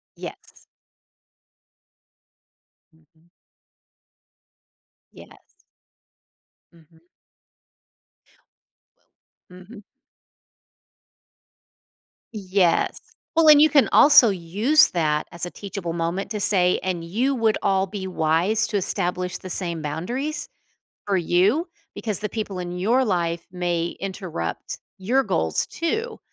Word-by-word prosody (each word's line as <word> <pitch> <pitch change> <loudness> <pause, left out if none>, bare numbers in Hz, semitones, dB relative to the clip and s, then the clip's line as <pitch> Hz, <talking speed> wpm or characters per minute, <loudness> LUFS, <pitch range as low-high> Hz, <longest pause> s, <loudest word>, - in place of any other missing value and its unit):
Yes. - - -10 2.2
Mhm. 160 +1 -31 1.8
Yes. - - -19 1.1
Mhm. 165 0 -24 2.5
Wel 180 - -14
mhm. 210 +1 -14 2.5
Yes, 190 -4 0 0.4
well, 330 -1 +4
and 300 -1 +8
you 310 - +7
can 280 -2 +3
also 285 -5 +7
use 205 - +4
that 155 -3 -1
as 170 -1 -4
a - - -6
teachable 195 -4 -6
moment 170 +4 -3
to 210 - -3
say, 185 -3 +3
"And 180 -3 -3
you 230 +11 -1
would 225 -2 +1
all 195 0 +1
be 190 -1 -6
wise 180 +6 +1
to 210 - -1
establish 180 -1 -2
the 185 - -9
same 170 -3 -1
boundaries 240 - -3 0.6
for 200 -2 0
you 190 - +1 0.3
because 215 -4 -2
the 210 - -4
people 210 -4 -5
in 175 0 -5
your 235 +7 +2
life 170 -4 -2
may 175 -2 -2
interrupt 185 - -5 0.2
your 245 +8 +1
goals - - -1
too, 440 +7 -3
190 Hz, 100 wpm, -23 LUFS, 170-220 Hz, 2.5 s, and